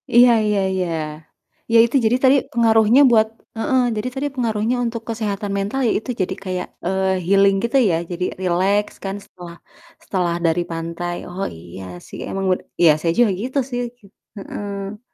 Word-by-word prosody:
Iya 245 Hz, 0 st, +8 dB
iya 210 Hz, -1 st, +1 dB
iya. 185 Hz, -2 st, -1 dB, 0.9 s
Ya -, -, +7 dB
itu 235 Hz, -, -4 dB
jadi 245 Hz, +3 st, +3 dB
tadi 265 Hz, +1 st, +6 dB, 0.2 s
pengaruhnya 225 Hz, +2 st, +5 dB
buat 220 Hz, -1 st, +5 dB, 0.3 s
heeh. 260 Hz, +2 st, +2 dB, 0.2 s
Jadi 220 Hz, +4 st, -2 dB
tadi 285 Hz, +2 st, -1 dB
pengaruhnya 230 Hz, -1 st, 0 dB
untuk 230 Hz, 0 st, -3 dB
kesehatan 210 Hz, -2 st, -3 dB
mental, 200 Hz, +7 st, -2 dB
ya -, -, +3 dB
itu, 235 Hz, -, -13 dB
jadi 180 Hz, -, -1 dB
kayak, 185 Hz, -1 st, -3 dB, 0.2 s
eee 190 Hz, +1 st, +1 dB, 0.2 s
healing 195 Hz, +1 st, +4 dB
gitu 255 Hz, +4 st, +1 dB
ya, 165 Hz, -, +2 dB, 0.2 s
jadi 175 Hz, +1 st, -2 dB, 0.2 s
rileks 190 Hz, +4 st, +1 dB
kan 195 Hz, +1 st, -3 dB
setelah 175 Hz, -2 st, -11 dB, 0.5 s
setelah 175 Hz, -3 st, -1 dB
dari 165 Hz, +2 st, +2 dB
pantai. 170 Hz, +1 st, -4 dB
Oh 190 Hz, +2 st, -4 dB
iya 90 Hz, +3 st, -10 dB, 0.2 s
sih, -, -, -9 dB
emang 195 Hz, 0 st, -3 dB
bene 185 Hz, -, 0 dB, 0.2 s
iya, 165 Hz, -3 st, +8 dB
saya 165 Hz, +1 st, 0 dB
juga 235 Hz, -4 st, +4 dB
gitu 260 Hz, +2 st, -1 dB
sih. 245 Hz, -, -2 dB, 0.6 s
Heeh. 200 Hz, +1 st, -6 dB
200 Hz, 165 wpm, -20 LUFS, 180-230 Hz, 0.9 s, Iya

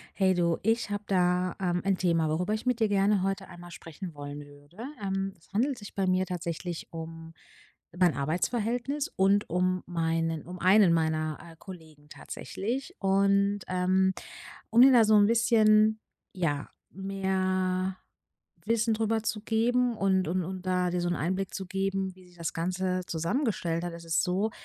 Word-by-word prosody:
Hey 190 Hz, -2 st, +3 dB
du, 170 Hz, -2 st, +1 dB
ich 225 Hz, 0 st, 0 dB
habe 205 Hz, 0 st, -3 dB
da, 180 Hz, -1 st, +1 dB
ähm, 175 Hz, -2 st, 0 dB
ein 195 Hz, -1 st, +1 dB
Thema, 165 Hz, -3 st, +1 dB
worüber 180 Hz, +7 st, 0 dB
ich 220 Hz, +3 st, -4 dB
mit 250 Hz, -1 st, +1 dB
dir 220 Hz, -, +3 dB
gerne 200 Hz, -1 st, +2 dB
heute 195 Hz, 0 st, -2 dB
einmal 175 Hz, 0 st, -12 dB
sprechen 170 Hz, +2 st, -9 dB
wollen 145 Hz, 0 st, -8 dB
würde. 145 Hz, +4 st, -18 dB, 0.2 s
Ähm, 195 Hz, 0 st, -2 dB
es 165 Hz, -, -26 dB
handelt 250 Hz, +8 st, +1 dB
sich 205 Hz, -, -11 dB
bei 195 Hz, -, 0 dB
mir 185 Hz, 0 st, +1 dB
tatsächlich 170 Hz, -1 st, -4 dB
um 165 Hz, 0 st, -8 dB, 0.6 s
mein 180 Hz, -3 st, +3 dB
Arbeitsverhältnis 235 Hz, -, -1 dB
und 200 Hz, -, +2 dB
um 180 Hz, +1 st, +1 dB
meinen 165 Hz, -2 st, -1 dB
um 180 Hz, +1 st, -8 dB
einen 190 Hz, -1 st, +5 dB
meiner, 155 Hz, -1 st, 0 dB
äh, 165 Hz, -1 st, -13 dB
Kollegen 160 Hz, -5 st, -13 dB
tatsächlich 255 Hz, -, -5 dB
und, 200 Hz, +1 st, +2 dB
ähm, 185 Hz, +1 st, +2 dB, 0.6 s
um 230 Hz, -, +4 dB
dir 265 Hz, +2 st, +9 dB
da 235 Hz, -3 st, +7 dB
so 215 Hz, 0 st, +4 dB
'n 205 Hz, -1 st, +6 dB
bisschen, 220 Hz, -2 st, +4 dB, 0.3 s
ja, 150 Hz, -6 st, -2 dB, 0.2 s
mehr 185 Hz, -1 st, -1 dB, 0.7 s
Wissen 230 Hz, 0 st, +2 dB
darüber 220 Hz, 0 st, 0 dB
zu 215 Hz, -1 st, -3 dB
geben 240 Hz, +2 st, +1 dB
und 190 Hz, -2 st, +1 dB
und 180 Hz, +3 st, 0 dB
und 185 Hz, +1 st, -6 dB
da 180 Hz, -1 st, +1 dB
dir 180 Hz, 0 st, -1 dB
so 175 Hz, -, -1 dB
'n 175 Hz, -, 0 dB
Einblick 185 Hz, +4 st, -2 dB
zu 190 Hz, -, -5 dB
geben, 195 Hz, 0 st, -2 dB
wie 185 Hz, -1 st, -17 dB
sich 175 Hz, 0 st, -20 dB
das 165 Hz, -1 st, -3 dB
Ganze 185 Hz, +2 st, -1 dB
zusammengestellt 170 Hz, -, -1 dB
hat, 175 Hz, -, -4 dB
es 170 Hz, 0 st, -10 dB
ist 165 Hz, 0 st, +1 dB
so, 190 Hz, +4 st, 0 dB
185 Hz, 170 wpm, -28 LUFS, 170-205 Hz, 0.7 s, dir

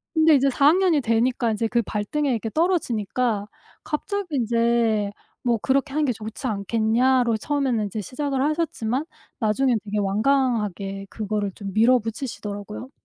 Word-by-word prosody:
근데 320 Hz, 0 st, +5 dB
이제 275 Hz, -1 st, +4 dB
4 280 Hz, +2 st, +3 dB
학년이 345 Hz, -2 st, +4 dB
되니까 235 Hz, 0 st, +1 dB
인제 220 Hz, +1 st, 0 dB
그 235 Hz, +1 st, +1 dB
발등에 255 Hz, +8 st, -1 dB
이렇게 225 Hz, -1 st, -2 dB
떨어지니까 240 Hz, -, 0 dB, 0.4 s
갑자기 355 Hz, +1 st, -3 dB
인제 230 Hz, -3 st, +1 dB, 0.3 s
뭐 240 Hz, -2 st, +2 dB
"그렇게 270 Hz, +5 st, 0 dB
하는 305 Hz, 0 st, +1 dB
게 250 Hz, -, +1 dB
좋지 220 Hz, +4 st, -6 dB
않겠냐."로 230 Hz, +4 st, +2 dB
처음에는 270 Hz, -4 st, 0 dB
인제 210 Hz, +2 st, -4 dB
시작을 270 Hz, -, -2 dB
하셨지만 295 Hz, -4 st, -1 dB, 0.3 s
나중에는 235 Hz, +2 st, +2 dB
되게 210 Hz, 0 st, -2 dB
완강하게 205 Hz, -3 st, 0 dB
그거를 210 Hz, -2 st, -2 dB
좀 195 Hz, -2 st, -7 dB
밀어붙이시더라고요. 225 Hz, -1 st, -1 dB
235 Hz, 360 characters per minute, -23 LUFS, 215-275 Hz, 0.4 s, 근데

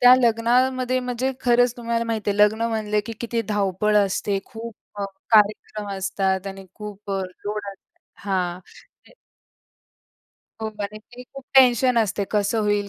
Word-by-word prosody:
त्या 250 Hz, 0 st, +9 dB
लग्नामध्ये 250 Hz, +2 st, +2 dB
म्हणजे 250 Hz, +1 st, -2 dB
खरंच 245 Hz, -1 st, +3 dB
तुम्हाला 235 Hz, -1 st, -1 dB
माहीती 220 Hz, -3 st, -1 dB
आहे, 200 Hz, -, -1 dB
लग्न 210 Hz, +2 st, +4 dB
म्हणलं 215 Hz, -2 st, -1 dB
की 230 Hz, -, -4 dB
किती 235 Hz, -1 st, -1 dB
धावपळ 205 Hz, 0 st, +1 dB
असते, 200 Hz, 0 st, +1 dB
खूप 230 Hz, 0 st, -8 dB, 0.3 s
अ, -, -, 0 dB, 0.3 s
कार्यक्रम 210 Hz, -1 st, +2 dB
असतात 190 Hz, 0 st, -1 dB
आणि 195 Hz, 0 st, -7 dB
खूप 210 Hz, -1 st, -9 dB
अ, 195 Hz, -, 0 dB, 0.2 s
लोड 210 Hz, +1 st, -2 dB
असत 195 Hz, -, -24 dB, 0.3 s
हां. 180 Hz, -3 st, -1 dB, 0.5 s
ते -, -, -19 dB, 1.5 s
हो, 220 Hz, -, -1 dB
बऱ्यापैकी 215 Hz, +4 st, -7 dB
खूप 275 Hz, -1 st, -9 dB
टेन्शन 250 Hz, -1 st, +6 dB
असते, 205 Hz, -2 st, 0 dB
"कसं 210 Hz, +1 st, +1 dB
होईल? 205 Hz, -1 st, +1 dB
215 Hz, 145 wpm, -23 LUFS, 200-240 Hz, 1.5 s, त्या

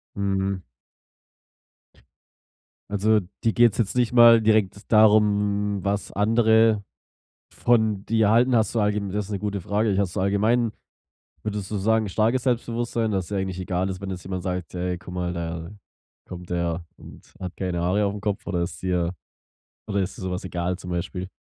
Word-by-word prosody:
Mhm. 95 Hz, -1 st, -1 dB, 2.3 s
Also, 105 Hz, +1 st, +3 dB, 0.2 s
dir 115 Hz, -, +3 dB
geht's 120 Hz, -2 st, +4 dB
jetzt 115 Hz, 0 st, -1 dB
nicht 120 Hz, -2 st, +2 dB
mal 120 Hz, -1 st, +8 dB
direkt 105 Hz, -2 st, +1 dB
darum, 105 Hz, -2 st, +3 dB
was 100 Hz, 0 st, -1 dB
andere 110 Hz, 0 st, +3 dB, 0.7 s
von 110 Hz, -4 st, +1 dB
dir 110 Hz, -2 st, +2 dB
halten? 120 Hz, +3 st, +4 dB
Hast 110 Hz, -2 st, +2 dB
du 115 Hz, -, +2 dB
allge 105 Hz, 0 st, +1 dB
das 105 Hz, +1 st, -2 dB
ist -, -, -11 dB
'ne 100 Hz, -, -2 dB
gute 100 Hz, -1 st, -3 dB
Frage. 105 Hz, +2 st, 0 dB
Hast 100 Hz, -2 st, -1 dB
du -, -, 0 dB
allgemein 110 Hz, +4 st, +2 dB, 0.7 s
würdest 105 Hz, -3 st, -4 dB
du 105 Hz, -, -2 dB
sagen, 110 Hz, +2 st, +1 dB
starkes 115 Hz, +6 st, +1 dB
Selbstbewusstsein, 120 Hz, -2 st, -1 dB
dass 95 Hz, -3 st, -1 dB
dir 100 Hz, -, -4 dB
eigentlich 95 Hz, -1 st, -3 dB
egal 95 Hz, +1 st, -1 dB
ist, 95 Hz, -1 st, -6 dB
wenn 100 Hz, -, -6 dB
jetzt 90 Hz, -2 st, -6 dB
jemand 90 Hz, -1 st, -5 dB
sagt: 90 Hz, -2 st, -3 dB
„Hey, 90 Hz, 0 st, -2 dB
guck 90 Hz, -, -11 dB
mal, 90 Hz, -1 st, -2 dB
da 85 Hz, 0 st, -5 dB, 0.6 s
kommt 90 Hz, -1 st, -9 dB
der 85 Hz, -1 st, -2 dB
und -, -, -15 dB
hat 90 Hz, -2 st, -6 dB
keine 90 Hz, -2 st, -2 dB
Haare 100 Hz, +4 st, +1 dB
aufm 100 Hz, 0 st, -4 dB
Kopf," 105 Hz, -2 st, -2 dB
oder 90 Hz, -4 st, -1 dB
ist 85 Hz, -3 st, -5 dB
dir 90 Hz, -2 st, 0 dB, 0.8 s
oder 100 Hz, -2 st, -1 dB
ist 95 Hz, 0 st, -4 dB
dir -, -, -9 dB
sowas 90 Hz, 0 st, -3 dB
egal, 90 Hz, 0 st, -2 dB
zum 90 Hz, -, -8 dB
Beispiel? 90 Hz, +1 st, -3 dB
100 Hz, 170 wpm, -24 LUFS, 90-110 Hz, 2.3 s, mal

